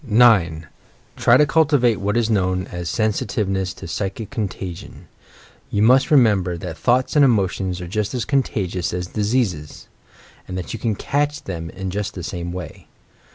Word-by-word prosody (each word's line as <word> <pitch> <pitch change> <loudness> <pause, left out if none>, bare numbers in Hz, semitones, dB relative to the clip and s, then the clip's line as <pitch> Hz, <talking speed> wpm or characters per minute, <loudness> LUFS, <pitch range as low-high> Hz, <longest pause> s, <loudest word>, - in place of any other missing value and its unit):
9. 105 - +4 0.5
Try - - +5
to 150 - +5
cultivate 145 -7 +3
what 100 +3 -1
is 115 -2 +2
known 95 -4 0
as 85 -1 -5
Sensitiveness 100 -3 -1
to - - -9
"psychic 100 +5 -4
contagion." 95 -7 -6 0.6
You 105 - +1
must 130 +4 +5
remember 105 - +3
that - - -6
thoughts 125 +3 +1
and 145 - +6
emotions 95 -6 +1
are 90 - -6
just 105 +5 -2
as 120 -3 -2
contagious 100 -11 -1
as 90 0 -2
diseases; 100 -7 -2 0.6
and 90 - -5
that 90 - -5
you 115 - -5
can 110 -3 -1
"catch" 145 +6 -1
them 80 -3 -5
in 95 +1 -5
just 105 +1 -3
the 90 - -6
same 85 0 -5
way! 90 -3 -8
100 Hz, 160 wpm, -21 LUFS, 90-120 Hz, 0.6 s, and